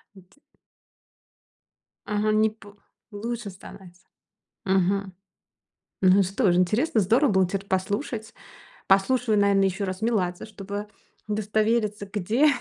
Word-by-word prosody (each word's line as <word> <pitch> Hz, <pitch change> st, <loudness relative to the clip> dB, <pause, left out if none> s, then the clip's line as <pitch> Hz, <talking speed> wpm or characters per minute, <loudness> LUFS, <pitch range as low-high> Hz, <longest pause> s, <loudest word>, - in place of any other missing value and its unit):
Эти 190 Hz, -, -20 dB, 1.7 s
Ага, 210 Hz, +1 st, 0 dB
не 215 Hz, 0 st, +3 dB
п 215 Hz, -2 st, -16 dB, 0.4 s
лучше 230 Hz, 0 st, -5 dB
становится. 185 Hz, -1 st, -14 dB, 0.6 s
Мгм. 190 Hz, 0 st, +1 dB, 0.9 s
Ну 190 Hz, +1 st, +6 dB
что 195 Hz, +2 st, +1 dB
же, 175 Hz, -, +2 dB
интересно, 220 Hz, -, +2 dB
здорово 230 Hz, +8 st, +3 dB
было 190 Hz, -2 st, +3 dB
теперь 195 Hz, +1 st, -4 dB
послушать. 215 Hz, +4 st, -3 dB, 0.5 s
Послушаю, 215 Hz, +3 st, +3 dB
наверное, 200 Hz, -1 st, +3 dB
ещё 195 Hz, +2 st, -2 dB
раз 185 Hz, +2 st, -5 dB
Меладзе, 185 Hz, -6 st, -1 dB
чтобы 205 Hz, 0 st, -7 dB, 0.4 s
удостовериться, 215 Hz, 0 st, 0 dB
где 215 Hz, +9 st, +2 dB
205 Hz, 110 wpm, -25 LUFS, 190-220 Hz, 1.7 s, Ну